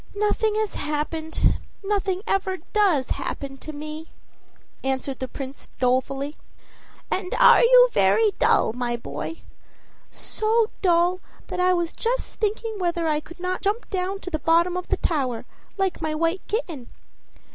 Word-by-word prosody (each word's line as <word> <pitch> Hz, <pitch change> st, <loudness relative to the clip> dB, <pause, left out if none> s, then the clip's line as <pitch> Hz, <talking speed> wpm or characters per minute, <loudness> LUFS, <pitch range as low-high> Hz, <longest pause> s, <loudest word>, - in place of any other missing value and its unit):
"Nothing 420 Hz, +1 st, +1 dB
has 435 Hz, -1 st, -1 dB
happened 305 Hz, +2 st, -1 dB, 0.3 s
nothing 390 Hz, -1 st, 0 dB
ever 380 Hz, -2 st, 0 dB, 0.2 s
does 375 Hz, -, +3 dB
happen 275 Hz, -1 st, -4 dB
to 310 Hz, -, -8 dB
me," 305 Hz, +2 st, -7 dB, 0.8 s
answered 265 Hz, 0 st, -2 dB
the 260 Hz, -, -3 dB
Prince 270 Hz, +2 st, -8 dB
dolefully. 270 Hz, +3 st, 0 dB, 0.8 s
"And 370 Hz, -1 st, -1 dB
are -, -, +8 dB
you -, -, +8 dB
very 445 Hz, -2 st, +4 dB
dull, 220 Hz, -, +4 dB
my 240 Hz, -1 st, -2 dB
boy?" 155 Hz, -4 st, -6 dB, 0.7 s
"So 440 Hz, +1 st, 0 dB
dull 355 Hz, 0 st, +3 dB, 0.3 s
that 360 Hz, -1 st, -4 dB
I 365 Hz, 0 st, +4 dB
was 345 Hz, -1 st, -1 dB
just -, -, -2 dB
thinking 435 Hz, 0 st, -2 dB
whether 345 Hz, -2 st, 0 dB
I 300 Hz, -1 st, +2 dB
could 340 Hz, +3 st, -13 dB
not 365 Hz, +1 st, -2 dB
jump 420 Hz, +4 st, -1 dB
down 380 Hz, 0 st, -1 dB
to 365 Hz, -, -7 dB
the 315 Hz, -, -1 dB
bottom 335 Hz, +4 st, +3 dB
of 365 Hz, 0 st, -3 dB
the -, -, +1 dB
tower, 255 Hz, -8 st, -1 dB, 0.3 s
like 385 Hz, -2 st, -1 dB
my 310 Hz, 0 st, -1 dB
white 330 Hz, +4 st, 0 dB
kitten." 335 Hz, -, -3 dB
345 Hz, 145 wpm, -24 LUFS, 285-395 Hz, 0.8 s, are